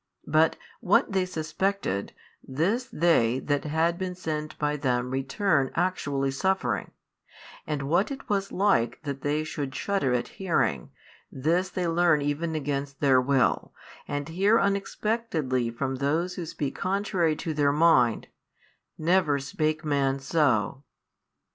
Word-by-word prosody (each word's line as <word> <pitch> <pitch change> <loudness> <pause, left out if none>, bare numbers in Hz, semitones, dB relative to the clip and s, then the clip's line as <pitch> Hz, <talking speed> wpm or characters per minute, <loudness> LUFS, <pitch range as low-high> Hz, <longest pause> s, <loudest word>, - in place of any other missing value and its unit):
But - - +3 0.2
what - - +3
they 190 -1 +1
suspected, 160 - -2 0.3
this 185 - 0
they 150 - +3
that 145 +1 -1
had 165 +3 +1
been 185 -1 -3
sent 155 -4 -4
by 150 0 0
them 125 -3 -1
returned 135 +2 +1
actually 145 -6 0
suffering, 135 - -1 0.8
and 150 -2 -2
what 170 +8 +1
it 275 -1 -7
was 195 -1 -1
like 180 - +1
that 140 -2 -5
they 150 +2 0
would 135 -2 -3
shudder 195 -9 0
at 120 - -1
hearing, 165 - 0 0.4
this 170 +7 0
they 180 -2 -2
learn 170 -2 +3
even 155 +3 -2
against 140 -2 -3
their 135 -3 +4
will, 135 -1 +1 0.3
and 145 0 -3
hear 195 +7 +3
unexpectedly 195 - -1
from 130 +3 -3
those 160 +7 0
who 175 -2 -5
speak 145 -3 -3
contrary 185 -4 0
to 160 +1 -4
their 145 -1 +2
mind, 145 -7 +3 0.7
Never 160 -3 +2
spake 155 +3 -2
man 140 -2 +1
so. 135 -4 +1
155 Hz, 135 wpm, -27 LUFS, 135-180 Hz, 0.8 s, their